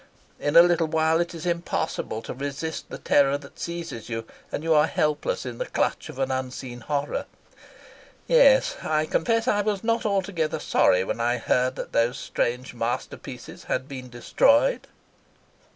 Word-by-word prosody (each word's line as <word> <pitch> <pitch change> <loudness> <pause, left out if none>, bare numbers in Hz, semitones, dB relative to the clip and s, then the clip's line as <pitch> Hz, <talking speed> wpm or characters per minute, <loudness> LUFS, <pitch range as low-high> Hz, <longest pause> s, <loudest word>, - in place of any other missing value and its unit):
In 145 - -1
a 170 - +11
little 175 -2 +2
while 160 +1 +2
it 170 0 -3
is 165 +1 -7
impossible 170 -9 -2
to - - -5
resist 145 +4 -5
the - - -6
terror 140 0 +3
that 140 -1 -15
seizes 170 -10 -5
you, 115 -1 -4 0.3
and 150 - -3
you 165 0 +3
are 150 -1 +5
helpless 150 -3 -1
in 120 -2 -6
the - - -2
clutch - - -1
of - - -9
an 135 0 -1
unseen 130 -1 -4
horror. 145 +3 -2 1.0
Yes; - - +5
I 155 0 0
confess 230 +9 +1
I 205 -4 +3
was 205 -1 -1
not 230 0 +1
altogether 190 -6 -1
sorry 90 +1 +3
when 95 - -3
I 120 +1 +1
heard 125 +2 +1
that - - -6
those 120 +3 +1
strange 125 0 -2
masterpieces 120 0 -5
had 130 - -2
been 130 -3 -8
destroyed." 280 - +2
150 Hz, 165 wpm, -25 LUFS, 125-175 Hz, 1.0 s, a